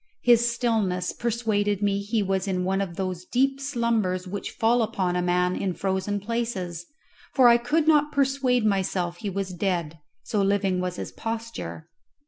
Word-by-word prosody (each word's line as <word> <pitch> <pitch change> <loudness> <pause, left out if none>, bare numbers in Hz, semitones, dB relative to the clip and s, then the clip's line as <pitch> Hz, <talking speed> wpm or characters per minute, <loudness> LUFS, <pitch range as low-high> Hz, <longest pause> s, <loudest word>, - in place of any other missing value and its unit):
His 235 -1 +5
stillness 215 -7 0
persuaded 210 -4 0
me 200 -1 +2
he 210 +1 0
was 190 0 -1
in 185 -1 0
one 195 +1 +1
of 180 -4 -4
those 185 -1 -3
deep 270 +6 +1
slumbers 230 -9 0
which 200 +2 -4
fall 235 +2 +2
upon 190 -5 -1
a 180 - +1
man 180 0 +1
in 185 -3 -2
frozen 195 +1 -1
places, 195 -6 -3 0.5
for 260 -3 +7
I 235 0 +7
could 295 +7 0
not 300 -1 +4
persuade 270 -4 +2
myself 185 -3 0
he 210 0 -4
was 195 0 -3
dead, 170 -4 -2 0.2
so 210 - -1
living 195 -2 +1
was 180 0 -2
his - - -6
posture. 225 -7 -5
200 Hz, 165 wpm, -25 LUFS, 185-235 Hz, 0.5 s, for